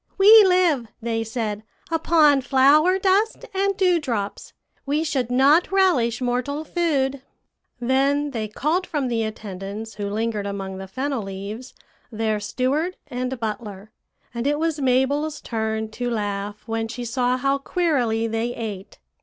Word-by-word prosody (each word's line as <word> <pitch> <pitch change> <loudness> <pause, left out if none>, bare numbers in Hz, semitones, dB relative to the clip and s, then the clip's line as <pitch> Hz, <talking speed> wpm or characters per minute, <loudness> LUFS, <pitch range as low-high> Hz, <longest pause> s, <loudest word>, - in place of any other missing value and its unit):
'We 420 +2 +9
live,' 350 -10 +3
they 225 -1 -2
said, 220 -2 -3 0.3
'upon 315 -3 +4
flower 285 +7 +4
dust 390 +3 +1
and 395 0 0
dewdrops; 295 - 0 0.3
we 295 +3 0
should 265 -6 -1
not 280 +8 +4
relish 320 - +2
mortal 255 +5 -1
food.' 280 -6 0 0.6
"Then 275 +4 +1
they 220 -4 -3
called 310 - -1
from 285 -6 -2
the 230 -1 0
attendants 215 0 -6
who 205 -1 -4
lingered 215 -1 -2
among 195 -1 -5
the 190 - -7
fennel 265 +5 -2
leaves 200 +5 -7 0.4
their 220 -1 -1
steward 275 - -1
and 255 0 -3
butler; 215 -2 -5 0.4
and 235 +2 -2
it 295 +1 +1
was 320 -1 -1
Mabel's 275 +4 +1
turn 220 -1 -3
to 245 +2 -3
laugh 205 -2 -3
when 225 0 -2
she 240 +1 -6
saw 250 +1 0
how 275 +2 0
queerly 270 -9 0
they 230 +2 -2
ate. 205 -4 -6
250 Hz, 140 wpm, -23 LUFS, 220-295 Hz, 0.6 s, We